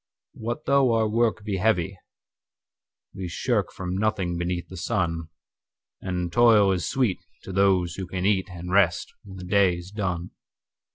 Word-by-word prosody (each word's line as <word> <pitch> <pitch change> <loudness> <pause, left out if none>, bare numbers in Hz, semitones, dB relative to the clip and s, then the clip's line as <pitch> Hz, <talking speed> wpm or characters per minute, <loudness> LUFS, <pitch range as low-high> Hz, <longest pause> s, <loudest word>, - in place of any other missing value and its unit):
What 120 +2 -5
though 135 -3 +4
our 110 -1 +2
work 110 -1 +1
he 100 -3 -1
heavy, 95 -2 +1 1.2
we 95 -1 -5
shirkFrom 90 +2 -2
nothing 95 -5 0
beneath 85 0 -2
the 95 - -10
sun; 85 -5 -1 0.7
And 90 -2 -3
toil 110 -4 +6
is 90 -3 -1
sweet 125 -8 +1 0.2
to - - -7
those 95 -3 +2
who 95 -2 -4
can 90 0 -4
eatAnd 95 -3 -1
rest 95 -2 +2
when 95 -2 -11
the 90 - -8
day 95 -1 +3
is 90 +2 -10
done. 90 -4 -3
95 Hz, 150 wpm, -25 LUFS, 90-105 Hz, 1.2 s, toil